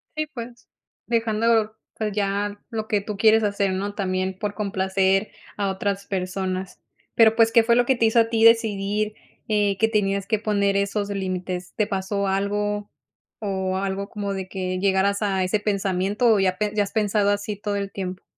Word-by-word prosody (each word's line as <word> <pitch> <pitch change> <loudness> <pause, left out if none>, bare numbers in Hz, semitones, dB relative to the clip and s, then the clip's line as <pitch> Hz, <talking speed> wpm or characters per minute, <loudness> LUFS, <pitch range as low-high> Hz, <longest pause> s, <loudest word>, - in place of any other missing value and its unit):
Sí, 310 0 -1
pues, 240 -4 -9 0.4
dejando, 225 -1 +1 0.2
pues 215 -1 -2
ya 205 0 -1
lo 220 -2 -4
que 205 -1 +1
tú 205 0 -6
quieres 220 +1 +5
hacer, 200 -1 0
¿no?, 200 +2 -3
también 185 -1 -2
por 205 0 -3
complacer 195 -1 0 0.3
a 200 -1 0
otras 200 0 -2
personas. 185 -1 -3 0.4
Pero, 225 -1 +6
pues, 225 -1 +4
¿qué 230 0 +5
fue 235 +1 +3
lo 245 0 +3
que 265 - +3
te 230 -2 +2
hizo 220 +1 +4
a 225 0 +3
ti 225 -1 +1
decidir, 215 -2 +3 0.3
eh, 205 -2 +1
que 225 - +4
tenías 200 -3 0
que 220 - +1
poner 200 -2 +1
esos 200 +1 -1
límites? 185 -2 -4
¿Te 215 -2 +1
pasó 195 0 -2
algo? 205 +1 -1 0.6
¿O 190 -1 -1
algo 195 +1 -2
como 200 -2 -4
de 190 -1 -4
que 185 -1 -3
llegaras 200 +1 +2
a 195 -3 +1
ese 185 +3 0
pensamiento, 200 +2 0
o 210 - +2
ya 185 -1 +1
pe 210 -1 -1
ya 210 - +2
has 200 - -8
pensado 210 -1 +2
así 205 0 -1
todo 205 0 -3
el 200 -1 -3
tiempo? 185 -1 -5
200 Hz, 185 wpm, -23 LUFS, 195-215 Hz, 0.6 s, Pero